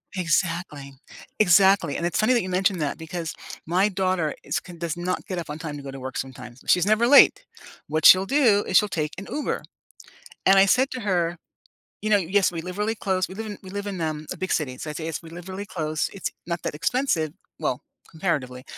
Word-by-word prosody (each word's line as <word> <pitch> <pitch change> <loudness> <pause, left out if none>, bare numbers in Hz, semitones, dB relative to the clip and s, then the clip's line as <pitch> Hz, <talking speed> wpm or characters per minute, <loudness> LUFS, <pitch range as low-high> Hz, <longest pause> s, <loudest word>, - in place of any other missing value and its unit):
Exactly. 170 -5 -1 0.5
Exactly, 190 -5 +5
and 170 - -2
it's 175 - 0
funny 220 +4 +4
that 240 - +3
you 185 - -5
mentioned 185 0 +1
that 145 0 -2
because 165 0 -5 0.3
my 185 +5 +2
daughter 185 -5 0
is - - -1
can 175 -1 -12
does 165 -1 -3
not 180 +1 -3
get 185 -2 -4
up 165 - -7
on 150 - -5
time 160 -3 -6
to 145 - -8
go 140 - -7
to 135 - -8
work 130 +1 -6
sometimes. 125 -1 -7
She's 180 +1 +4
never 215 +3 +3
late. 285 - +7 0.4
What 155 0 -1
she'll 185 +1 +9
do 235 -7 +4
is - - +4
she'll 210 - +4
take 155 -4 -2
an 195 - -8
Uber. 300 - -2 0.8
And 195 0 +6
I 195 - +7
said 260 +7 +3
to 255 - -5
her, 175 -5 0 0.6
you 215 - -2
know 205 - +6
yes, 190 +1 +2
we 165 -2 -4
live 180 +2 -7
really 215 +2 0
close, 190 -3 -1
we 190 - -9
live 220 +1 -5
in 205 -1 -6
we 190 - -11
live 200 +1 -5
in, 190 -4 -4
um, 155 -1 -3
a - - -4
big 185 - -3
city, 130 -5 -1
so, 155 - -6
I'd 150 - -5
say 160 -1 -4
it's 165 - -4
we 165 - -12
live 175 +2 -10
really 195 +2 -5
close, 155 -6 -2
it's 195 - -3 0.2
not 170 -2 -3
that - - -3
expensive- 160 - 0 0.3
well, - - -1 0.3
comparatively. 130 -7 -2
180 Hz, 230 wpm, -24 LUFS, 155-200 Hz, 0.8 s, she'll